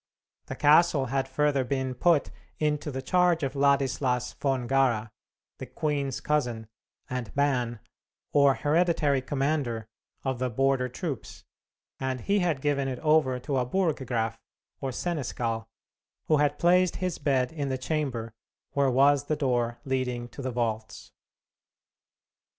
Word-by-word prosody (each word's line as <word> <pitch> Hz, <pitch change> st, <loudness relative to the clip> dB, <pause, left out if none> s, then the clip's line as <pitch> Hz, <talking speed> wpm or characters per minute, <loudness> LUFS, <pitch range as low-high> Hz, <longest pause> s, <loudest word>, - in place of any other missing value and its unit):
The -, -, -5 dB
castle 150 Hz, -1 st, +4 dB
had 135 Hz, -1 st, 0 dB
further 140 Hz, 0 st, +1 dB
been 130 Hz, 0 st, -2 dB
put 155 Hz, +4 st, +2 dB, 0.3 s
into 150 Hz, 0 st, -1 dB
the 130 Hz, -1 st, -5 dB
charge 175 Hz, 0 st, +2 dB
of 135 Hz, -, -1 dB
Ladislas 135 Hz, -3 st, +1 dB
von 135 Hz, -3 st, -1 dB
Gara, 120 Hz, -5 st, +1 dB, 0.5 s
the -, -, -6 dB
queen's 140 Hz, -4 st, -2 dB
cousin, 120 Hz, -7 st, -1 dB, 0.4 s
and 125 Hz, -5 st, -4 dB
Ban, 125 Hz, -5 st, +1 dB, 0.5 s
or 140 Hz, -2 st, +5 dB
hereditary 150 Hz, -3 st, +2 dB
commander, 135 Hz, -4 st, -1 dB, 0.4 s
of 130 Hz, -3 st, -2 dB
the 130 Hz, 0 st, 0 dB
border 135 Hz, +1 st, +1 dB
troops, 145 Hz, 0 st, -6 dB, 0.6 s
and 130 Hz, -2 st, -2 dB
he 200 Hz, -, +1 dB
had 170 Hz, -7 st, 0 dB
given 140 Hz, -1 st, 0 dB
it 130 Hz, -2 st, -3 dB
over 150 Hz, -5 st, +3 dB
to 135 Hz, +2 st, -2 dB
a 125 Hz, -, +1 dB
Burggraf, 130 Hz, -, -1 dB, 0.4 s
or 135 Hz, -, -3 dB
seneschal, 120 Hz, -8 st, -3 dB, 0.6 s
who 155 Hz, -, +3 dB
had 145 Hz, 0 st, +2 dB
placed 180 Hz, +1 st, +3 dB
his 180 Hz, -2 st, -3 dB
bed 130 Hz, -3 st, +1 dB
in 145 Hz, -4 st, -3 dB
the 130 Hz, -, -1 dB
chamber 130 Hz, -5 st, -3 dB, 0.4 s
where 140 Hz, -1 st, +2 dB
was 140 Hz, +2 st, +4 dB
the 155 Hz, -, 0 dB
door 120 Hz, -5 st, 0 dB
leading 125 Hz, -2 st, -2 dB
to 140 Hz, -, -9 dB
the 130 Hz, -, -2 dB
vaults. 110 Hz, -3 st, -3 dB
135 Hz, 140 wpm, -27 LUFS, 125-150 Hz, 0.6 s, or